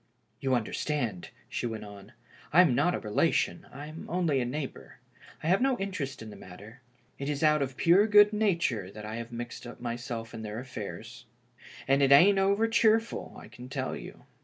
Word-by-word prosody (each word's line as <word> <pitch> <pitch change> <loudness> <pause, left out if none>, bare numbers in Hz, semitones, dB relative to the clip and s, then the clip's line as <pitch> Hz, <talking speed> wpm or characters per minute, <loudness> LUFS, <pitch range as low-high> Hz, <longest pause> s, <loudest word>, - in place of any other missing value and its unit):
"You 130 -1 +1
understand," 120 - -2 0.2
she - - -3
went 110 -2 -5
on, 100 +2 -12 0.2
" - - -24
I 170 +5 +7
am 165 -8 +4
not 175 +8 +2
a - - -3
relation, 105 -1 0
I'm 150 +5 -9
only 165 -6 +1
a - - -1
neighbor. 135 +3 -6 0.5
I - - -2
have 190 +6 +3
no 265 -1 +2
interest 145 - -4
in 110 - -9
the - - -10
mat 90 -1 -12
ter. 110 +5 -13 0.4
It 140 +1 -3
is 145 +1 -2
out 150 -1 +4
of 135 -1 -3
pure 185 +6 +5
good 210 0 +6
nature 170 - 0
that 105 +2 -9
I 110 +1 -5
h^ave 115 0 -7
mixed 120 0 -7
myself 120 -1 -5
up - - -19
in 115 - -6
their 105 0 -6
affairs. 120 -1 -8 0.6
And 135 +1 +3
it 140 0 +4
ain't 195 +8 +7
over 200 +3 +2
cheerful, 225 0 +1
I - - -11
can 125 +1 -12
tell 130 -1 -3
you. - - -10
135 Hz, 200 wpm, -29 LUFS, 115-175 Hz, 0.6 s, I